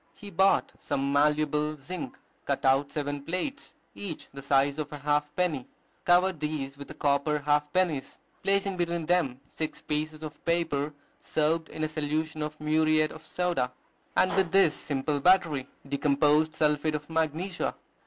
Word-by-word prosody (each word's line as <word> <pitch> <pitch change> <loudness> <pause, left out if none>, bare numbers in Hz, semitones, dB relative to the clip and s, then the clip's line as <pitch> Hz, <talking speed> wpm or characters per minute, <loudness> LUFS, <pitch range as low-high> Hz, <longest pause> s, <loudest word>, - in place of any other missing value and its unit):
He 205 -1 -10
bought 195 0 +3
some 140 0 -1
malleable 150 +1 +2
zinc, 185 - -6 0.3
cut 140 -1 -1
out 135 +2 +3
seven 145 -1 -3
plates, 185 - -4 0.2
each 185 -6 -6
the 140 - -7
size 140 +1 +2
of 150 0 -3
a 150 - -5
half 150 +1 +1
penny, 160 -8 0 0.4
covered 180 -1 +4
these 150 -3 -3
with 140 0 -9
the - - -9
copper 145 +1 +1
half 150 0 +1
pennies, 160 -7 0 0.2
placing 195 -1 +1
between 170 -1 -1
them 155 -7 +1
six 155 +2 -4
pieces 155 +1 -3
of 155 0 -8
paper 155 -4 0 0.2
soaked 160 +1 0
in 155 - -5
a - - +2
solution 155 +1 -2
of 150 0 -4
muriate 155 0 +3
of 160 - -10
soda, 175 -10 -1 0.4
and 185 - +4
with 190 -3 +2
this 190 -5 +5
simple 145 0 -1
battery, 155 -5 +3 0.2
decomposed 150 +2 +2
sulphate 150 0 +2
of 150 0 -5
magnesia. 160 +3 -1
155 Hz, 155 wpm, -28 LUFS, 145-170 Hz, 0.4 s, this